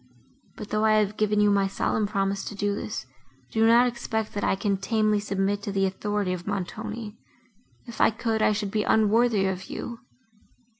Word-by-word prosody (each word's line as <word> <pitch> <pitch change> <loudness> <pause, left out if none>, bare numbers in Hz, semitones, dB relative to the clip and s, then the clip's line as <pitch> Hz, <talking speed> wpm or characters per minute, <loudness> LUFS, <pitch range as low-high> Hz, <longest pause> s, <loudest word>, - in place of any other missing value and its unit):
But, 210 -1 -8
though 215 +1 0
I 220 0 +4
have 215 -1 +2
given 210 -1 +1
you 210 0 +4
my 200 -1 +3
solemn 205 +2 -1
promise 195 -1 -1
to 210 - -6
do 205 0 0
this, - - -5 0.5
do 225 0 +3
not 235 +2 +6
expect, 230 -3 -3
that 205 - -3
I - - +2
can 200 0 0
tamely 215 +1 +1
submit 200 0 -1
to 200 - -4
the 195 0 +1
authority 200 0 -1
of 180 +1 -7
Montoni; 210 +3 -5 0.7
if 235 -3 -6
I - - +6
could, 225 0 -2
I 215 - +4
should 205 -1 -2
be 215 - +1
unworthy 220 -1 +3
of 190 -1 -2
you. 235 -1 -6
210 Hz, 190 wpm, -26 LUFS, 200-220 Hz, 0.7 s, not